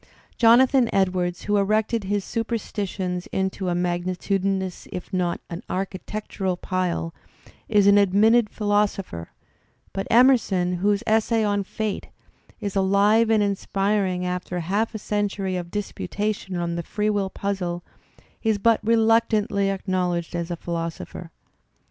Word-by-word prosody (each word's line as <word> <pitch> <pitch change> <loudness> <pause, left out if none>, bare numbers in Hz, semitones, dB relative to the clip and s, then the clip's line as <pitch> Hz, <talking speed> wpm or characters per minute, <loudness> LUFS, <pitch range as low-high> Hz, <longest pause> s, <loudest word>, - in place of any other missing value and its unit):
Jonathan 245 +1 +5
Edwards, 180 -2 0
who 205 0 +1
erected 215 +2 +1
his 200 0 -1
superstitions 200 -5 -3
into 190 0 -2
a 175 - 0
magnitudinous 185 +2 -1
if 180 +2 -7
not 180 -2 0
an 170 0 -6
architectural 190 0 -3
pile, 180 -3 -2 0.6
is 205 -2 +4
an 200 0 +7
admitted 210 +3 +4
philosopher; 205 - -1 0.6
but 195 - -3
Emerson 220 -8 +4
whose 200 +3 +1
essay 220 +1 +2
on 205 -1 +1
"Fate 215 +1 -4 0.5
is 200 -1 -4
alive 200 +4 +4
and 220 -2 +4
inspiring 195 -2 0
after 180 0 -3
half 205 +7 -1
a - - 0
century 205 -2 -2
of 175 -1 -4
disputation 205 0 -3
on 170 -1 -2
the 170 - -2
free 210 +5 -1
will 200 -2 0
puzzle, 180 -4 -3 0.6
is 220 -2 +1
but 225 +2 +3
reluctantly 220 -3 +2
acknowledged 180 -3 -1
as 170 0 -3
a 175 - -2
philosopher. 170 0 -5
195 Hz, 125 wpm, -24 LUFS, 180-210 Hz, 0.6 s, an